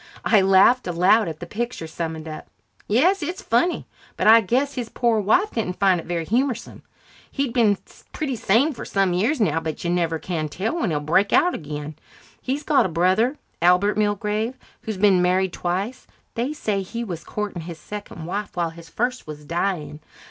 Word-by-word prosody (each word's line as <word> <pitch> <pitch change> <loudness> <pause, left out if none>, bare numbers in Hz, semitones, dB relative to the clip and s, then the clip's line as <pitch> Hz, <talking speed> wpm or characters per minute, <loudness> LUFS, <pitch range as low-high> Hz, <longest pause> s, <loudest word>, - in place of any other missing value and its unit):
I 215 -4 +5
laughed 195 +6 +5
aloud 180 +5 +3
at 160 0 -6
the - - -4
picture 235 -1 -4
summoned 160 0 -5
up. 155 -1 -8 0.4
"Yes, 345 - +3
it's 350 +5 -4
funny, 245 +11 +1 0.3
but - - -1
I 225 +1 +8
guess 255 +8 0
his 245 -3 -4
poor 235 -3 +1
wife 355 - +2
didn't 185 -6 -3
find 190 -3 +3
it - - -15
very 170 -1 -2
humorsome. 240 - -1 0.5
He's 275 -3 -2
been 220 -5 +3 0.3
pretty 275 -4 -3
sane 235 +8 +2
for - - -8
some 195 -3 +1
years 230 - +1
now, 165 -8 +2
but 160 -2 -5
you 170 - 0
never 170 -2 0
can 155 -1 -3
tell 210 - -2
when 225 - 0
he'll 150 -2 0
break 175 +7 +2
out 355 0 +4
again. 150 -1 -6 0.4
He's 275 +3 -2
got 290 -8 +3
a - - -7
brother, 185 - +2 0.2
Albert 180 +4 +4
Milgrave, 210 +3 0 0.3
who's 220 -3 -5
been 190 -2 +4
married 180 0 +2
twice. 190 +8 -3 0.3
They 245 +5 -2
say 210 -9 -2
he 230 +5 -5
was 175 -7 -6
courting 210 -4 -4
his 165 0 -8
second 200 -3 -8
wife 200 +4 -4
while 170 -2 -1
his 165 0 -13
first 245 +5 -2
was 150 -1 -9
dying. 165 -3 -2
200 Hz, 185 wpm, -23 LUFS, 170-235 Hz, 0.5 s, I